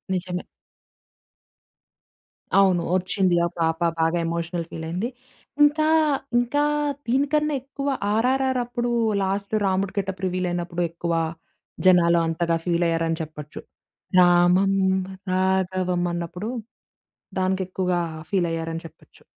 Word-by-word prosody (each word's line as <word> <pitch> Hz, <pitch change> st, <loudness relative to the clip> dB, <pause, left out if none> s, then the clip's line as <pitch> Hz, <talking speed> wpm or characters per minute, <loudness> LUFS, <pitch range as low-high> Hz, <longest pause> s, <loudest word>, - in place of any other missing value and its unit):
నిజమే. 180 Hz, 0 st, -3 dB, 2.1 s
అవును. 190 Hz, -3 st, +4 dB
ఓచ్చింది. 185 Hz, -1 st, +1 dB
ఆ -, -, +1 dB
పాప 165 Hz, 0 st, +1 dB, 0.2 s
బాగా 165 Hz, +1 st, +2 dB
ఎమోషనల్ 170 Hz, 0 st, -3 dB
ఫీలయింది. 170 Hz, +8 st, -3 dB, 0.5 s
ఇంకా, 305 Hz, +1 st, +4 dB, 0.5 s
ఇంకా 265 Hz, +5 st, +1 dB, 0.4 s
దీనికన్నా 290 Hz, +4 st, +1 dB
ఎక్కువ 275 Hz, +1 st, -6 dB, 0.2 s
'ఆర్ఆర్‌ఆర్' 260 Hz, +3 st, +2 dB
అప్పుడు 240 Hz, 0 st, -2 dB, 0.3 s
లాస్ట్‌లో 200 Hz, +2 st, -1 dB
రాముడు 190 Hz, +1 st, 0 dB
గెటప్ 195 Hz, -1 st, -2 dB
రివీలైనప్పుడు, 175 Hz, -1 st, -2 dB
ఎక్కువ 170 Hz, 0 st, -3 dB, 0.7 s
జనాలు 170 Hz, -2 st, +5 dB
అంతగా 165 Hz, +1 st, 0 dB
ఫీల్ 175 Hz, -1 st, +1 dB
అయ్యారని 165 Hz, 0 st, 0 dB
చెప్పొచ్చు. 150 Hz, -1 st, -8 dB, 0.6 s
రామం 180 Hz, +2 st, +5 dB, 0.6 s
రాఘవం 185 Hz, -1 st, +1 dB
అన్నప్పుడు, 175 Hz, +5 st, -4 dB, 0.9 s
దానికి 190 Hz, 0 st, +1 dB
ఎక్కువగా 180 Hz, -1 st, 0 dB, 0.3 s
ఫీలైయ్యారని 165 Hz, -3 st, -1 dB
చెప్పొచ్చు. 160 Hz, -, -18 dB
180 Hz, 95 wpm, -24 LUFS, 170-200 Hz, 2.1 s, జనాలు